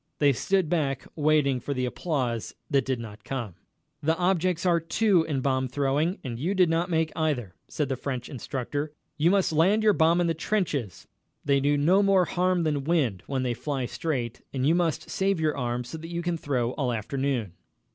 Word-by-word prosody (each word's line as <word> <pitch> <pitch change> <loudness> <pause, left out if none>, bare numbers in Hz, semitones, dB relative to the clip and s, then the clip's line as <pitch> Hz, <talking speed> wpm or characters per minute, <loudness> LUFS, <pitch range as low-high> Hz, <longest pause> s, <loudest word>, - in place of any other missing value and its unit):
They 145 -2 +4
stood 190 +7 +1
back 140 -6 -1
waiting 150 -4 +2
for 140 +3 -4
the 130 0 0
applause 125 -5 -2 0.2
that 135 -3 +3
did 130 -2 -1
not 105 -2 -9
come. 120 -8 -4 0.5
"The 160 +2 +1
objects 180 -1 +1
are 170 -2 +4
two 185 +3 +2
in 140 -4 -1
bomb 130 -1 +1
throwing, 145 +7 0
and 120 -4 -5
you 180 +9 -1
did 180 -3 +4
not 170 +2 0
make 160 -2 +1
either," 145 - -1
said 150 - -2
the 130 - -1
French 130 -1 -4
instructor. 145 +3 -4 0.3
"You 160 +3 +4
must 195 -3 +2
land 190 +8 +3
your 215 -1 +5
bomb 165 0 +3
in 175 - +2
the 165 - +1
trenches 160 - -2 0.4
they 140 -1 +3
do 145 +1 +2
no 175 +8 +4
more 195 -2 +4
harm 180 0 +1
than 150 -3 0
wind 135 - +1
when 135 -2 -1
they 125 -1 0
fly 135 0 -3
straight 125 -4 -3
and 130 -1 -1
you 160 - +5
must 170 -3 0
save 195 -2 +1
your 155 -1 +1
arm 125 -2 -2
so 160 +7 -8
that 165 +1 -8
you 170 0 -3
can 175 0 0
throw 130 -6 -1
all 130 -3 -1
afternoon." 120 -2 -2
150 Hz, 200 wpm, -27 LUFS, 130-170 Hz, 0.5 s, your